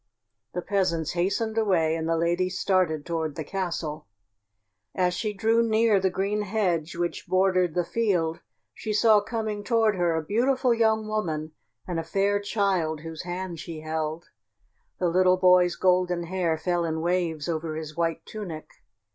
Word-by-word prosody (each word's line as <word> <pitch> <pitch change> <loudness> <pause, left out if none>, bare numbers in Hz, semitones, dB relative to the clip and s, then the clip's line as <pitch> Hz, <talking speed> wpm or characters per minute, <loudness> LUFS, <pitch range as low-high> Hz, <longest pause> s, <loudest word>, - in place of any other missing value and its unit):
The 180 - -2
peasants 175 -5 0
hastened 200 +6 0
away 170 -7 +2
and 165 0 -3
the 165 - +2
lady 175 +2 +1
started 185 -5 0
toward 160 -3 -2
the 160 - -4
castle. 165 - -4 0.9
As 180 -1 +2
she 215 +3 -2
drew 225 +3 +2
near 220 -2 +3
the 190 0 +1
green 200 +3 -1
hedge 185 -6 -1
which 175 0 -3
bordered 185 -3 +2
the 175 -1 +1
field 175 -7 0 0.3
she 215 - -4
saw 215 0 +5
coming 215 -1 -3
toward 225 -2 +2
her 175 -2 +1
a 160 - -1
beautiful 250 - +2
young 220 -1 +2
woman 160 -8 -2 0.4
and 175 -2 -2
a - - -3
fair 200 +4 +1
child 195 -7 0
whose 160 0 -7
hand 180 -1 -5
she 160 -1 -7
held. 155 +1 -4 0.7
The 180 - 0
little 185 +1 +4
boy's 180 -1 +5
golden 180 -1 +2
hair 170 -2 -1
fell 175 +2 0
in 160 -1 -2
waves 170 -3 -1
over 160 -1 -2
his 155 -1 -6
white 165 -1 -1
tunic. 180 -8 -7
180 Hz, 160 wpm, -26 LUFS, 165-205 Hz, 0.9 s, saw